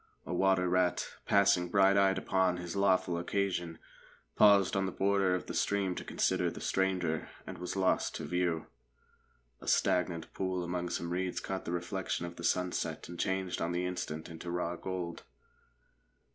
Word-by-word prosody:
A 90 - -4
water 95 0 +3
rat, 90 0 +1 0.2
passing 100 -3 +4
bright 100 +1 +5
eyed 95 -1 +4
upon 95 -1 +1
his 90 0 -6
lawful 95 -3 +2
occasion, 85 -2 -1 0.6
paused 100 -2 +6
on 95 -1 +1
the - - -3
border 95 -1 +2
of 90 - -4
the - - -6
stream 100 -2 +1
to - - -6
consider - - +1
the - - -8
stranger, 90 -4 0 0.2
and - - -8
was 90 - -4
lost 95 -1 +1
to - - -4
view. 90 -2 0 0.9
A - - -12
stagnant 85 -2 +1
pool 95 -1 -2
among 90 0 -2
some 85 0 -3
reeds 90 +1 -1
caught 95 -1 -4
the - - -3
reflection 90 0 -2
of 85 0 -7
the 85 - -9
sunset 90 +1 -1
and 85 - -8
changed 95 -1 -1
on 85 +1 -1
the 90 +1 -1
instant 80 -3 -4
into 85 +1 -8
raw 85 0 -2
gold. 90 -2 -5
90 Hz, 170 wpm, -32 LUFS, 85-95 Hz, 0.9 s, paused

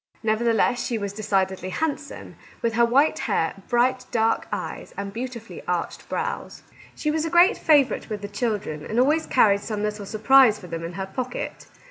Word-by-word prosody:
Nevertheless, 230 +2 +2
she 235 - -2
was 200 -2 -4
decidedly 190 -3 -1
hand 300 +9 -1
some, 280 - -11 0.3
with 230 -1 +1
her 235 +1 +3
white 275 +6 +3
hair, 165 +4 -1
bright, 255 +1 +2
dark 225 -1 +1
eyes, - - -5
and 200 0 -5
beautifully 235 0 -6
arched - - -3
brows. - - -4 0.3
She 300 - -1
was 310 0 0
a 325 - -2
great 350 +6 +5
favourite 290 -6 +3
with 210 -2 -5
the - - -3
children, 205 -8 -3
and 220 +8 -1
always 300 +5 +2
carried 200 -5 +4
some 210 -1 -4
little 210 -1 -3
surprise 225 +1 +5
for 205 - -12
them 165 -1 -5
in 170 +1 -5
her 190 +2 -4
pocket. 245 +6 -5
225 Hz, 180 wpm, -24 LUFS, 200-255 Hz, 0.3 s, great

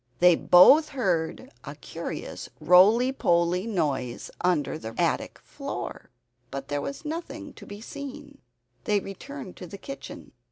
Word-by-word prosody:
They 180 0 +6
both 270 - +7
heard 185 - -1
a - - -8
curious - - -7
roly 215 +8 +6
poly 175 -3 +1
noise 140 - -2
under 175 -6 +1
the 115 -6 -7
attic - - 0
floor. - - -6 0.4
But 135 +1 -6
there 145 0 -1
was 280 - -6
nothing 305 -1 -6
to - - -13
be 205 +1 -9
seen. 285 +3 -9 0.5
They 210 -1 +2
returned 200 +4 -9
to 180 - -8
the 200 - -9
kitchen. 275 +7 -9
195 Hz, 135 wpm, -26 LUFS, 170-275 Hz, 0.5 s, both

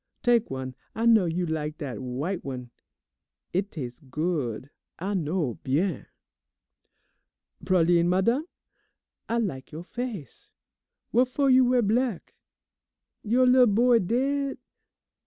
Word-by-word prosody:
Tak' 240 -2 +3
one, 130 -1 -5 0.2
I 225 - -1
know 225 -5 +6
you 175 +2 -1
lak 155 -1 -3
dat 140 -6 -5
w'ite 140 +9 -3
one. 125 -3 -6 0.8
It 190 +3 0
tas' 125 -9 -7
good, 145 -4 -3 0.3
I 195 +4 -3
know, 160 - -1
bien. 150 +4 -1 1.6
"Pralines, 175 -1 +3
madame? 230 - +1 0.8
I 230 - +1
lak' 165 - -3
you' 160 +2 -7
face. 215 - -7 0.6
What 250 +3 +4
fo' 275 +3 -1
you 260 -1 +6
wear 245 -1 +3
black? 225 -1 0 0.9
You' 245 +4 +3
lil' 250 0 +6
boy 235 +3 +4
daid? 270 +7 0
185 Hz, 120 wpm, -26 LUFS, 150-240 Hz, 1.6 s, know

